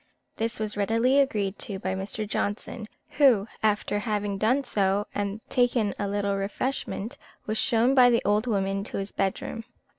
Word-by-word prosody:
This 230 +1 -2
was 215 -1 -2
readily 230 +6 +3
agreed 210 -8 0
to 200 - -5
by 190 0 -2
Mr. 200 +3 -4
Johnson, 210 +2 -3 0.3
who, 240 -8 +5
after 210 -1 +1
having 205 -2 -2
done 250 +7 +2
so, 200 -4 +1
and 205 +1 -3
taken 245 -4 +2
a 205 - -1
little 200 0 0
refreshment, 215 +2 -3 0.3
was 215 +1 -1
shown 235 +3 +3
by 250 -2 +7
the 235 -1 +2
old 210 +4 +2
woman 195 -2 0
to - - -5
his 195 0 -4
bedroom. 195 +3 -2
210 Hz, 160 wpm, -26 LUFS, 200-230 Hz, 0.3 s, by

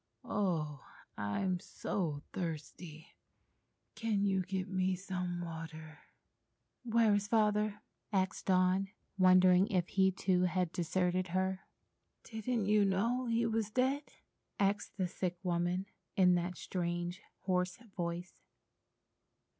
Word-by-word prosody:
"Oh, 155 -8 -1 0.3
I'm 175 - -1
so 160 -6 -3
thirsty! 160 -1 -6 0.8
Can 215 -3 0
you 190 -1 +2
get 190 +1 -3
me 185 -1 +1
some 180 -1 -3
water?" 160 -2 -7 0.8
"Where 230 -2 +4
is 205 0 +1
Father?" 210 -1 +2 0.3
asked 190 -2 0
Dawn, 185 +1 +3 0.3
wondering 185 0 +6
if 180 -5 0
he 190 -1 +4
too 185 -1 +1
had 180 -1 0
deserted 180 +1 0
her. 190 0 -1 0.6
"Didn't 225 -1 -2
you 210 0 +4
know 230 +6 +1
he 230 0 +2
was 225 -2 0
dead?" 260 +5 +1 0.6
asked 200 0 0
the 185 -2 +1
sick 180 0 -3
woman, 175 +1 0 0.3
in 180 -2 +6
that 175 0 -1
strangely 175 +1 -3 0.2
hoarse 180 -1 0 0.2
voice. 175 0 -3
185 Hz, 115 wpm, -34 LUFS, 175-205 Hz, 0.8 s, wondering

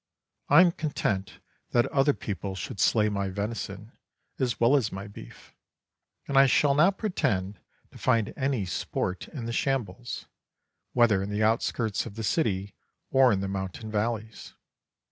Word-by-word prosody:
I 145 +5 +8
am 180 -2 +5
content 105 - -2 0.4
that 120 - +4
other 140 +1 +3
people 95 -1 -5
should 95 - -6
slay 105 +4 +3
my 100 -2 -1
venison 105 +1 -5 0.5
as 125 -2 0
well 120 +4 +5
as 120 -7 +1
my 95 +1 -6
beef; 100 - -13 0.7
and 135 -1 +4
I 135 - +7
shall 140 +2 +4
not 170 +7 +4
pretend 100 - -1 0.3
to - - -14
find 115 -4 +1
any 130 -7 -1
sport 90 +1 -3
in 130 -7 -7
the 115 - -3
shambles, 120 -4 -2 0.7
whether 115 -5 +4
in 100 - -4
the 105 +1 0
outskirts 110 -1 0
of 100 - -10
the 115 - -5
city 100 - 0 0.4
or 130 -2 +5
in 95 -2 +1
the 100 - -2
mountain 95 +3 -5
valleys. 110 0 -3
110 Hz, 155 wpm, -27 LUFS, 100-130 Hz, 0.7 s, I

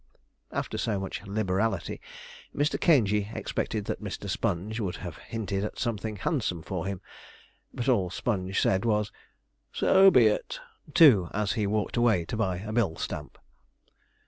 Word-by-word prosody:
After - - -3
so 105 -3 0
much 95 -1 -5
liberality, 100 -1 -1 0.5
Mr. 145 +1 0
Caingey 105 - +3
expected 105 -2 -2
that - - -3
Mr. 100 -1 -5
Sponge 100 +2 -2
would 95 -5 -2
have 85 -5 -7
hinted 105 -3 -3
at 105 - -4
something 110 -2 -2
handsome 100 - -1
for 90 +1 -4
him; 100 -1 -4 0.7
but 120 - -4
all 100 -9 +3
Sponge 95 -1 -1
said 95 0 +2
was, 105 -2 +1 0.6
'So 190 +1 +6
be 125 -10 +6
it,' 105 - 0 0.4
too, 110 - +7
as 105 -1 0
he 105 -4 0
walked 105 +2 -1
away 110 -8 +3
to - - -4
buy 95 -5 0
a 105 +4 -6
bill 110 -8 +1
stamp. 75 - -6
105 Hz, 150 wpm, -28 LUFS, 95-115 Hz, 0.7 s, too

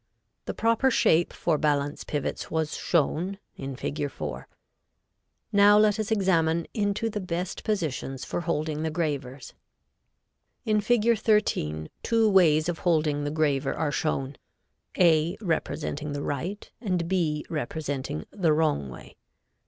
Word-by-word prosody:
The - - -4
proper 230 +4 +2
shape 170 -8 +3
for 160 -4 0
balance 145 -1 0
pivots 145 -2 -3
was 160 -2 -1
shown 175 +4 0 0.2
in 135 -1 -6
Fig. 145 +2 -3
4. 75 - -6 1.1
Now 205 +1 +7
let 210 0 +4
us 215 - -2
examine 170 -6 +2
into 205 +1 0
the 210 -1 -3
best 180 0 -4
positions 145 - -2
for - - -3
holding 155 -2 -2
the 160 - -1
gravers. 145 -5 -3 1.1
In 215 -2 +2
Fig. 230 0 +2
13 80 - +1
two 225 -1 +2
ways 165 -6 +4
of 175 -2 -2
holding 155 -4 +1
the - - 0
graver 145 -3 0
are 150 -2 -1
shown, 135 -3 -2 0.6
A 170 0 +4
representing 155 -5 -2
the 145 0 -3
right 175 +9 -4
and 180 -7 -1
B 165 -5 0
representing 140 - -4
the 175 -6 +2
wrong 150 - +1
way. 65 - -12
160 Hz, 135 wpm, -27 LUFS, 145-195 Hz, 1.1 s, Now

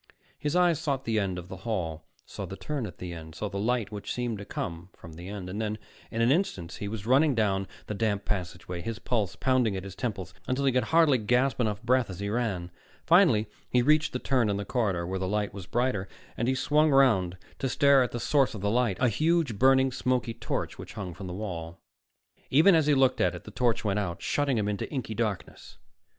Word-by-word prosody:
His 150 +2 -1
eyes 175 -4 +4
sought 140 -5 -2
the 110 -1 +1
end 95 -3 -1
of 90 0 -7
the 95 - -8
hall, 90 -6 -3 0.2
saw - - -7
the - - -7
turn 145 -7 -3
at 90 - -11
the 90 -1 -6
end, 80 -1 -9
saw 105 +4 -3
the 100 +1 -4
light 115 0 0
which 105 -1 -5
seemed 120 -4 -2
to 100 - -7
come 85 -1 -5
from 85 - -12
the 85 +3 -9
end; 100 -3 -6
and 100 +4 -4
then 105 0 -2 0.3
in 115 - -2
an 120 - +4
instant 95 - 0
he 100 - -5
was 105 -1 -5
running 135 +4 +4
down 100 -3 +1 0.2
the - - -4
damp 105 -1 -1
passageway, 90 -2 -4
his 115 +5 -4
pulse 110 -6 -1
pounding 130 -6 +2
at 95 - -5
his 100 -2 -8
temples, 95 -5 -4
until 130 +2 0
he 135 - +4
could 125 -1 +1
hardly 160 -3 +4
gasp 125 +4 +1
enough 105 -4 -1
breath 125 -1 +2
as 95 -1 -7
he 100 0 -2
ran. 100 -6 -2 0.3
Finally 165 - +5 0.2
he 125 -1 +3
reached 155 +3 +3
the - - -2
turn 125 -4 +1
in 100 - 0
the 100 - -4
corridor 100 -9 0
where 95 +2 -3
the 95 - -2
light 105 +1 -1
was 95 -2 -8
brighter, 120 -6 0 0.3
and 115 - -1
he 130 - +2
swung 150 +3 +3
around 110 -10 +4 0.2
to 135 - -1
stare 140 +1 +5
at 125 - 0
the 120 - -3
source 135 0 +2
of 105 - -6
the 100 +1 0
light, 120 -5 +1
a 130 - +4
huge, 155 -2 +1
burning, 130 +1 +5
smoky 125 -2 -1
torch - - -4
which - - -8
hung 95 -4 -5
from 95 +2 -8
the - - -5
wall. 85 -4 -6 0.7
Even 160 +8 +6
as 160 -3 +3
he 150 - +5
looked 130 -1 +3
at - - +2
it, - - -9
the - - -10
torch 120 -3 0
went 105 0 +1
out, 85 -4 -3
shutting 140 -4 0
him 105 -2 0
into 105 -1 -2
inky 130 -6 -3
blackness. 105 -4 -4
110 Hz, 235 wpm, -28 LUFS, 95-130 Hz, 0.7 s, Even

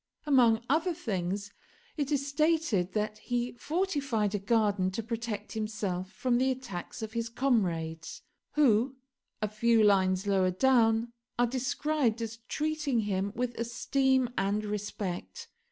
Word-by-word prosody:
Among 240 -6 +4
other 325 +5 +1
things, 200 - -3 0.4
it 290 -2 -2
is 280 -1 +1
stated 285 - +1
that 215 0 -2
he 245 0 -2
fortified 280 - -1
a 205 - 0
garden 205 -2 +2
to 205 +4 -4
protect 225 -2 -4
himself 210 -4 -3
from 240 +4 +1
the 260 +1 +2
attacks 240 -6 -5
of 220 0 -6
his 230 -1 -2
comrades, 175 -11 -1 0.3
who, 260 -3 +3 0.5
a - - +2
few 225 +2 +3
lines 190 -2 +3
lower 190 -2 +3
down, 230 +2 +3 0.2
are 245 - +4
described 260 0 0
as 225 -1 -4
treating 300 -5 0
him 200 -1 -1
with 245 0 -1
esteem 260 +2 +1
and 200 +2 0
respect. 210 - -5
230 Hz, 135 wpm, -30 LUFS, 205-265 Hz, 0.5 s, Among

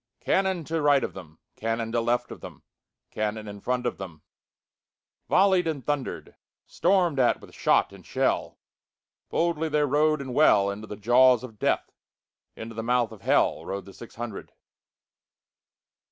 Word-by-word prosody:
Cannon 190 -3 0
to 160 +1 -2
right 145 -2 +4
of - - -3
them, 80 -5 -12 0.2
Cannon 115 0 -2
to 115 0 +1
left 120 +1 -1
of - - -9
them, - - -11 0.5
Cannon 110 0 -3
in 100 -1 -9
front 125 0 -1
of 120 - -2 1.3
themVolley'd 190 -3 +4
and 145 -6 -3
thunder'd; 145 -3 -3 0.3
Storm'd 175 -5 +1
at 125 - +3
with - - -15
shot - - +2
and - - -14
shell, - - -1 0.7
Boldly 165 -1 0
they 150 0 +2
rode 150 +2 +2
and 130 -2 -6
well, 100 -9 +4
Into 105 +2 -8
the 105 - -7
jaws 125 +3 +4
of 110 -5 -10
Death, - - 0 0.6
Into 115 +1 -8
the 115 - -4
mouth 120 0 +1
of 110 - -12
HellRode 95 -1 0
the 100 - -13
six 120 - -12
hundred. 115 -3 -7
125 Hz, 155 wpm, -26 LUFS, 110-150 Hz, 1.3 s, right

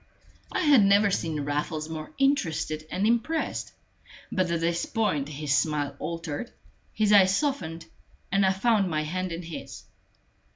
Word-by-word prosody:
I - - -1
had 290 - +6
never 200 +1 +4
seen 160 -5 -1
Raffles 150 +2 -2
more 155 -1 -6
interested 165 - 0
and 190 +5 -1
impressed; 235 +8 0 0.6
but 185 -2 0
at 170 -1 0
this 170 +1 0
point 150 - 0
his 150 -1 -2
smile 145 -3 0
altered, 165 +5 -5 0.4
his 210 -1 +2
eyes 195 -1 +6
softened, 170 - -2 0.5
and 195 +1 +3
I 190 - +4
found 200 0 +2
my 155 -2 -1
hand 185 +3 -3
in 170 +1 -5
his. 165 -1 -8
170 Hz, 150 wpm, -27 LUFS, 155-205 Hz, 0.6 s, had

